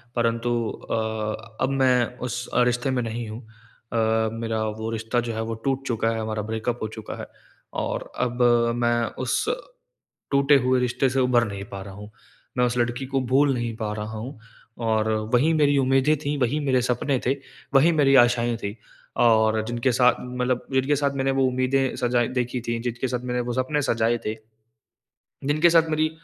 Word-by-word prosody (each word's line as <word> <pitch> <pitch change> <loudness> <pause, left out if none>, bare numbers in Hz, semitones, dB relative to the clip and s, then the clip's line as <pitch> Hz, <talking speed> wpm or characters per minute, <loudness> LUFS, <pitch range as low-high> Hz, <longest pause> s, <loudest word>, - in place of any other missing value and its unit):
परंतु 115 0 0 0.2
अ, 110 0 -4
अब 130 - +2
मैं 130 -3 +3 0.2
उस 125 +1 -4
रिश्ते 125 +2 +2
में 125 -1 0
नहीं 115 0 -4
हूँ। 110 +3 -7 0.5
अ, 110 -1 +2
मेरा 115 -1 -2 0.2
वो 110 0 -3
रिश्ता 115 +2 -1
जो 120 -1 -3
है, 110 - -3
वो 115 0 -3
टूट 135 0 0
चुका 115 -2 0
है, 115 - -2
हमारा 110 -1 -2
ब्रेकअप 115 +2 -2
हो - - -1
चुका 110 - -7
है - - -7 0.6
और - - -4
अब 125 0 -1 0.3
मैं 120 -1 +1 0.2
उस 125 - 0 0.9
टूटे 140 +1 +5
हुए 130 0 +3
रिश्ते 125 +2 +1
से 135 - 0
उभर 125 -2 +3
नहीं 100 -1 -6
पा 100 -1 -6
रहा 100 -1 -10
हूँ। 105 +1 -10 0.5
मैं 125 - +4
उस 125 0 -1
लड़की 120 +2 -1
को 135 -1 0
भूल 135 +2 +3
नहीं 120 -2 -3
पा 110 -2 -3
रहा 110 +1 -5
हूँ 120 +2 -7 0.5
और 110 0 +1 0.2
वही 150 +7 +4
मेरी 145 -2 +3
उम्मीदें 135 +3 +3
थीं, 145 0 0
वही 130 +5 +1
मेरे 130 -3 +2
सपने 125 +2 0
थे, 135 +2 +1 0.4
वही 150 +5 +6
मेरी 140 -3 +4
आशाएँ 120 -1 0
थी 105 0 -5 0.4
और 110 -2 +4
जिनके 120 +2 0
साथ 125 0 +4
मतलब 125 0 -2
जिनके 135 +3 +2
साथ 140 0 +1
मैंने 135 0 +1
वो 135 0 +1
उम्मीदें 130 +1 +1
सजाई 120 -1 +1
देखी 125 -1 -2
थीं, 115 0 -1
जिनके 120 +1 -2
साथ 125 0 -2
मैंने 125 0 -1
वो 120 0 -3
सपने 130 +4 0
सजाए 115 0 +1
थे, 110 - -1 1.1
जिनके 155 +4 +4
साथ 165 -1 +4
मेरी 155 0 +1
120 Hz, 185 wpm, -24 LUFS, 115-135 Hz, 1.1 s, वही